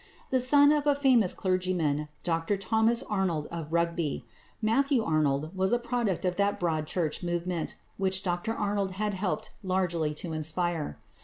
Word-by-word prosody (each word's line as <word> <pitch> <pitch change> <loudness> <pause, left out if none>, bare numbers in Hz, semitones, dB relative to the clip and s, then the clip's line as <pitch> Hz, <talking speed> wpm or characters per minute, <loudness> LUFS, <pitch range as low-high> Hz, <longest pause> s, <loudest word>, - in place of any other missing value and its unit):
The 260 - +3
son 285 +3 +6
of 295 -1 +1
a 290 - +4
famous 255 -9 +4
clergyman, 180 -6 0 0.2
Dr 165 +4 0
Thomas 220 +5 +2
Arnold 185 -7 -1
of 165 -2 -6
Rugby, 170 -5 -1 0.3
Matthew 250 +3 +2
Arnold 155 -1 0
was 190 0 +1
a 240 - +4
product 235 -7 -1
of 180 -1 0
that 200 0 +1
Broad 160 -3 -1
Church 160 -4 -1
movement 175 -1 -2 0.2
which 190 0 +1
Dr 180 +5 -1
Arnold 200 -2 -1
had 210 +2 -1
helped 190 -1 -2
largely 180 -5 0
to 165 +1 -5
inspire. 160 - -2
185 Hz, 155 wpm, -28 LUFS, 165-215 Hz, 0.3 s, son